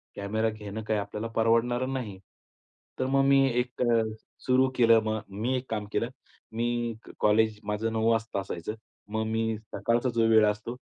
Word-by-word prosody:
Camera 110 +3 -1
घेणं 110 0 -7
काय 110 0 0
आपल्याला 105 +2 -4
परवडणारं 120 +3 +2
नाही. 110 -8 -4 0.8
तर 130 - +1
मग 135 +1 +2
मी 135 0 +5
एक 125 0 -3
अ, 115 -2 +3 0.4
सुरू 130 +1 +4
केलं 115 -2 +5
मग. 110 0 -1
मी 110 +6 -2
एक 130 +1 -7
काम 105 -2 -2
केलं. 115 - 0 0.4
मी 115 +1 -1 0.3
एक 110 0 -12
कॉलेज, 105 0 +3
माझं 105 +2 -2
9:00 110 0 +2
वाजता 115 -2 0
असायचं. 95 +2 -5 0.3
मग 110 +1 -1
मी 110 0 0 0.2
सकाळचा 120 +2 +1
जो 115 -1 +3
वेळ 110 -1 +6
असतो, 105 +3 -2
110 Hz, 170 wpm, -28 LUFS, 105-120 Hz, 0.8 s, वेळ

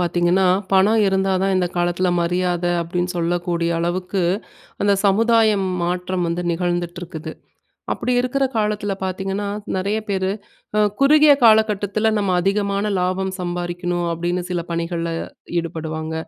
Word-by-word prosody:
பார்த்தீங்கன்னா, 175 +2 +2 0.3
"பணம் 205 +4 +4
இருந்தாதான் 190 0 +1
இந்த 180 -1 +2
காலத்ல 175 +1 +1
மரியாத" 175 0 0 0.2
அப்டின்னு 175 +2 -2
சொல்லக்கூடிய 170 0 -1
அளவுக்கு 180 +2 -1 0.6
அந்த 200 0 +4
சமுதாயம் 215 -1 +3 0.2
மாற்றம் 180 +1 -1
வந்து 170 +1 -2
நிகழ்ந்துட்ருக்குது. 175 -2 -3 0.6
அப்டி 250 - -2
இருக்குற 255 +2 0
காலத்துல 210 -1 -1
பாத்தீங்கன்னா, 195 +2 -3 0.3
நெறைய 200 +3 -1
பேரு, 190 -1 0 0.5
அ - - +4 0.2
குறுகிய 295 +1 +6
காலகட்டத்துல 215 -1 +3
நம்ம 200 -3 0
அதிகமான 200 +1 0
லாபம் 185 +1 -1
சம்பாரிக்கணும் 175 0 -2
அப்டின்னு 175 +2 -2
சில 175 -1 -1
பணிகள்ல 170 0 -2 0.5
ஈடுபடுவாங்க. 160 -1 -5
185 Hz, 115 wpm, -21 LUFS, 175-200 Hz, 0.6 s, குறுகிய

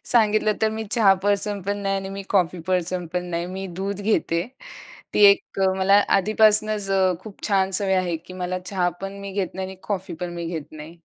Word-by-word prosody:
सांगितलं 215 -2 +3
तर 220 - +4
मी 220 0 -4
चहा 220 -5 +5
पर्सनपण 205 -1 -1
नाही 195 0 0
आणि 195 0 -4
मी 195 0 -6
कॉफी 180 -3 +1
पर्सनपण 180 -1 -2
नाही, 170 +1 -2
मी 190 +1 -6
दूध 195 +3 -5
घेते. 195 -5 0 0.7
ती 210 - +5
एक 200 - -2 0.2
मला 195 +2 +5
आधीपासनंच 215 0 +3 0.3
खूप 205 0 -13
छान 195 -2 +2
सवय 195 -2 0
आहे, 180 -2 0
की 170 +3 -13
मला 185 0 -3
चहापण 185 +1 -3
मी 200 0 -7
घेत 190 -2 -3
नाही 190 0 -4
आणि 190 0 -9
कॉफीपण 180 -3 -4
मी 170 -1 -5
घेत 160 -3 -6
नाही. 155 +2 -10
195 Hz, 180 wpm, -23 LUFS, 180-205 Hz, 0.7 s, चहा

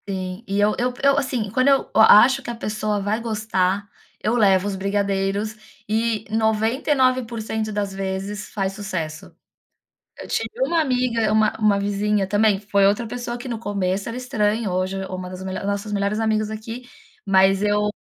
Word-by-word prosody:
Sim, 185 +1 -4
e 200 +1 -1
eu 210 +1 +3
eu 250 +1 0
eu, 275 0 +4
assim, 250 -7 -1
quando 255 +3 +2
eu 275 -1 +3
eu 220 - +5
acho 250 +6 +7
que - - -8
a 240 - -3
pessoa 215 -2 -2
vai 205 +3 -1
gostar, 205 -3 -1 0.3
eu 220 +3 0
levo 195 -4 +3
os 200 - -2
brigadeiros 200 +2 -1 0.3
e 220 0 0
noventa 220 +5 0
e 295 - +5
99% 230 -4 0
das 205 -2 -2
vezes 195 +2 -4
faz 195 -2 -2
sucesso. 175 -6 -5 0.9
Eu - - -9
tive - - -2 0.2
uma 340 -7 +1
amiga, 250 -6 +1
uma 215 0 +3
uma 210 -2 +3
vizinha 205 0 0
também, 205 +1 +2
foi 200 -1 +2
outra 210 +4 +1
pessoa 240 +1 -5
que 245 - -8
no 235 -3 -4
começo 200 -1 -2
era 230 - -5
estranho, 215 -4 -1
hoje 185 +1 -1
é 190 - -5
uma 185 -1 -6
das 185 0 -8
melhore 190 +1 -4
nossos 200 +1 -2
melhores 200 +1 0
amigos 215 -1 0
aqui, 225 +3 -7 0.4
mas 195 0 +4
eu 210 0 +2
210 Hz, 180 wpm, -22 LUFS, 195-225 Hz, 0.9 s, acho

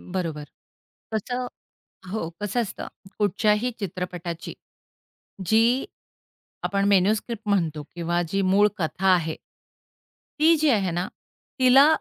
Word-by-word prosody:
बरोबर. 165 -5 -4 0.7
कसं 250 +4 -2 0.7
हो, 200 -6 -2
कसं 210 +4 0
असतं 215 - -5 0.3
कुठच्याही 210 +3 +2
चित्रपटाची 180 -3 -5 0.9
जी 230 +6 +3 0.8
आपण 200 0 +1
मेनुस्क्रिप्ट 210 +3 +1
म्हणतो 165 -7 +1
किंवा 175 0 0
जी 195 +3 +1
मूळ 195 +2 +4
कथा 175 +3 -1
आहे 165 -3 0 1.1
ती 325 +2 +6
जी 310 - +3
आहे 200 -7 +2
ना, 175 +1 0 0.5
तिला 260 +2 +7
200 Hz, 105 wpm, -25 LUFS, 175-225 Hz, 1.1 s, तिला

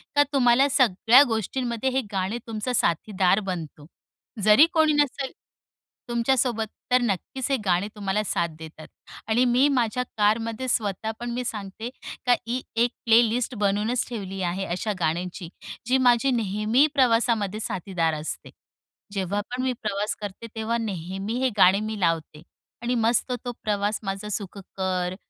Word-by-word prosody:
का 290 - +6
तुम्हाला 260 0 +4
सगळ्या 245 -1 +5
गोष्टींमध्ये 235 +2 -1
हे 265 +1 0
गाणे 195 +4 -1
तुमचं 225 +3 -3
साथीदार 185 +1 +2
बनतो. 155 -4 -6 0.6
जरी 215 +8 +7
कोणी 315 -2 +4
नसेल 285 -2 0 0.8
तुमच्यासोबत, 235 -1 +1 0.2
तर 250 0 +5
नक्कीच 240 +5 -2
हे 270 - +3
गाणे 185 +2 +2
तुम्हाला 205 +1 -1
साथ 170 -3 0
देतात. 160 -1 -10 0.4
आणि 235 +3 +3
मी 250 +3 +4
माझ्या 250 -1 +1
कारमध्ये 225 +4 +1
स्वतः 220 -2 -1
पण 240 +1 -3
सांगते 215 +1 -5 0.4
का, 245 - +5
ही 250 +2 -1
एक 235 +1 +2
प्लेलिस्ट 235 +2 +3
बनवूनच 210 +3 0
ठेवली 195 -4 -5
आहे 190 +2 -3
अशा 185 +5 -2
गाण्यांची, 170 +2 -2 0.4
जी 260 +1 +3
माझी 250 +1 +3
नेहमी 220 +4 +2
प्रवासामध्ये 230 -5 +2
साथीदार 180 -5 -1
असते. 155 +1 -5 0.6
जेव्हा 195 0 -1
पण 250 +1 -2
मी 260 - +1
प्रवास 210 0 -1
करते, 205 +3 -7
तेव्हा 225 +1 -1
नेहमी 195 -1 -4
हे 260 0 +2
गाणे 190 +1 +6
मी 215 0 -4
लावते 165 -3 -1 0.4
आणि 245 +1 -1
मस्त 235 +2 +2
तो 245 - -2
प्रवास 205 0 0
माझा 195 +1 -4
सुखकर, 190 -2 -3
220 Hz, 140 wpm, -25 LUFS, 195-245 Hz, 0.8 s, जरी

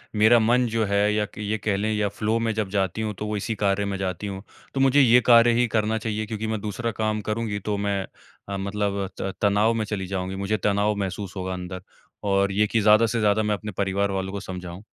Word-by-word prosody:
मेरा 110 +3 +6
मन 120 +3 +3
जो 115 0 0
है 100 +1 +2
या 105 0 +1
क 100 - -17
ये 105 +1 -2
कह 100 0 -1
लें 110 +2 -1
या 105 -1 +1
फ़्लो 110 +3 -1
में 115 -1 0
जब 105 -3 -2
जाती 95 +1 -1
हूँ, 110 -1 -2
तो 105 - -6
वो 105 0 -2
इसी 110 +2 -3
कार्य 100 0 0
में 100 -1 -2
जाती 95 +2 -3
हूँ, 95 0 -6 0.3
तो 135 - -2
मुझे 135 +1 +5
ये 125 -1 +6
कार्य 120 -1 +7
ही 120 - +3
करना 110 0 0
चाहिए 110 0 -3
क्योंकि 110 0 -4
मैं 110 -1 -2
दूसरा 115 +2 -3
काम 110 -1 0
करूँगी 105 -1 -2
तो 105 +1 -2
मैं 100 -1 -1 0.5
अ, 100 - -3
मतलब 100 0 -2
त 95 - -3
तनाव 105 +2 +3
में 110 -1 -1
चली 95 -3 -4
जाऊँगी, 95 0 -3
मुझे 100 +2 -1
तनाव 105 +1 +1
महसूस 100 0 -4
होगा 95 0 -3
अंदर। 90 0 -6 0.4
और 100 0 +2
ये 105 +2 +2
कि, 115 - +1
ज़्यादा 110 +2 +6
से 115 +1 -1
ज़्यादा 105 0 +2
मैं 105 0 +1
अपने 105 +1 -7
परिवार 100 0 0
वालों 95 0 -2
को 100 - -3
समझाऊँ? 90 0 -8
105 Hz, 240 wpm, -24 LUFS, 100-110 Hz, 0.5 s, कार्य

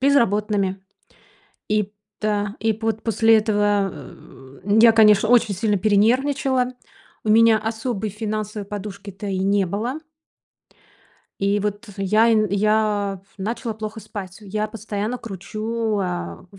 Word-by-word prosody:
безработными. 210 -7 +2 0.9
И 210 -1 0 0.3
та 205 -1 -1
и 225 0 +2
пот 220 0 -3
после 225 0 +4
этого, 205 -2 +1
э, 135 -1 -13 0.2
я, 230 0 +8
конечно, 215 -1 +5
очень 235 -4 +4
сильно 210 +1 +1
перенервничала. 250 +5 +2 0.5
У - - -3
меня 225 0 +6
особой 220 -1 -3
финансовой 215 -1 -4
подушки-то 200 -1 -7
и 190 -1 -2
не 195 +1 +2
было. 235 - -3 1.4
И 200 +1 +1
вот 210 +2 -4
э 195 - -3
я 215 +4 +4
н 215 -1 +3
я 205 -1 +1
пф 195 - -32
начала 225 +3 -3
плохо 220 +1 -6
спать. 190 -2 -8
Я 210 +1 -3
постоянно 215 +2 -4
кручу, 215 +1 -3
а, 180 -1 -4
в 195 - -16
210 Hz, 130 wpm, -22 LUFS, 200-225 Hz, 1.4 s, я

